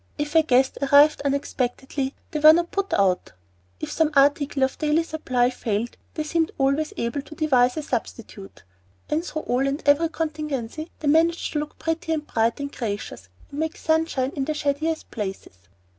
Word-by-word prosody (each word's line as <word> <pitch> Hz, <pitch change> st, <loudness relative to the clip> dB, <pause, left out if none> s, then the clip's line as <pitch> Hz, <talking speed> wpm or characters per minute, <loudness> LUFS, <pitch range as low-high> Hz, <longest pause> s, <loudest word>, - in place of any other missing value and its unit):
If 295 Hz, 0 st, -3 dB
a 325 Hz, -, +6 dB
guest 265 Hz, -3 st, +2 dB
arrived 285 Hz, +2 st, +5 dB
unexpectedly 270 Hz, -1 st, -2 dB, 0.2 s
they 305 Hz, -, -2 dB
were 310 Hz, +1 st, +9 dB
not 340 Hz, +1 st, 0 dB
put 395 Hz, -1 st, -2 dB
out; 190 Hz, -2 st, +1 dB, 0.5 s
if -, -, -5 dB
some 320 Hz, -2 st, +2 dB
article 280 Hz, 0 st, +3 dB
of 265 Hz, -, -1 dB
daily 305 Hz, +1 st, +2 dB
supply 255 Hz, -7 st, 0 dB
failed, 230 Hz, -1 st, -3 dB, 0.2 s
they 310 Hz, -, -1 dB
seemed 325 Hz, +1 st, 0 dB
always 275 Hz, +3 st, +1 dB
able 235 Hz, +4 st, -2 dB
to 310 Hz, +3 st, -13 dB
devise 255 Hz, -4 st, +2 dB
a 310 Hz, -, -2 dB
substitute; 225 Hz, -6 st, -6 dB, 0.5 s
and 315 Hz, +2 st, +1 dB
through 310 Hz, -3 st, -5 dB
all 255 Hz, +3 st, 0 dB
and 280 Hz, +3 st, -2 dB
every 305 Hz, +3 st, +4 dB
contingency 305 Hz, -2 st, -4 dB
they 305 Hz, -, -2 dB
managed 330 Hz, +3 st, +2 dB
to 300 Hz, -, 0 dB
look 300 Hz, 0 st, -6 dB
pretty 325 Hz, 0 st, -2 dB
and 305 Hz, -1 st, -3 dB
bright 230 Hz, -1 st, 0 dB
and 280 Hz, 0 st, -5 dB
gracious, 205 Hz, -, -5 dB, 0.2 s
and 285 Hz, -, -6 dB
make 320 Hz, +1 st, -2 dB
sunshine 315 Hz, -5 st, 0 dB
in 275 Hz, -2 st, -1 dB
the 310 Hz, +1 st, -2 dB
shadiest 305 Hz, +2 st, -2 dB
places. 195 Hz, -, -5 dB
290 Hz, 175 wpm, -24 LUFS, 255-315 Hz, 0.5 s, were